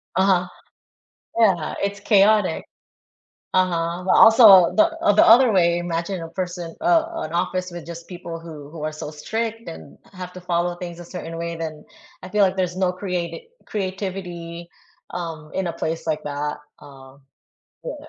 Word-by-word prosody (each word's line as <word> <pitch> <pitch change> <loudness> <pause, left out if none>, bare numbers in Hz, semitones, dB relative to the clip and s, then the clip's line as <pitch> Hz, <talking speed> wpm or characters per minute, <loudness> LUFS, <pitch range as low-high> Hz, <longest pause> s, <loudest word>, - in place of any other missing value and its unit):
Uh-huh, 185 -1 +3 0.9
yeah, 185 -8 +2
it's 200 0 -2
chaotic, 205 -4 +3 0.9
uh-huh, 175 -1 0
but 190 - -1
also, 220 -6 +8
the 320 +1 +5 0.3
the - - +6
other 240 +1 +7
way, 170 -3 +3
imagine 175 +2 -3
a 165 - -6
person, 175 -1 -5
uh, 335 -1 +3 0.2
an 155 - -6
office 180 +1 -1
with 175 -2 -9
just 170 0 -9
people 175 -2 -7
who 155 -4 -10
who 160 -1 -9
are 155 - -1
so 155 -1 -7
strict 225 +8 -4
and 80 -3 -10 0.2
have 180 -1 -8
to 185 - -10
follow 175 0 -1
things 175 -1 -7
a 175 - -9
certain 165 -1 -7
way, 170 0 -4
then 160 -2 -6 0.4
I - - -7
feel 210 +1 +2
like 190 0 +3
there's 180 -1 -1
no 185 -1 +1
creati 180 - -4 0.2
creativity, 185 -4 -5 0.4
um, 165 -3 -6
in 190 -2 -1
a - - -3
place 165 0 -4
like 155 -1 -1
that, 150 0 -3 0.2
um, 135 0 -15 0.6
yeah. - - -4
175 Hz, 165 wpm, -22 LUFS, 165-190 Hz, 0.9 s, also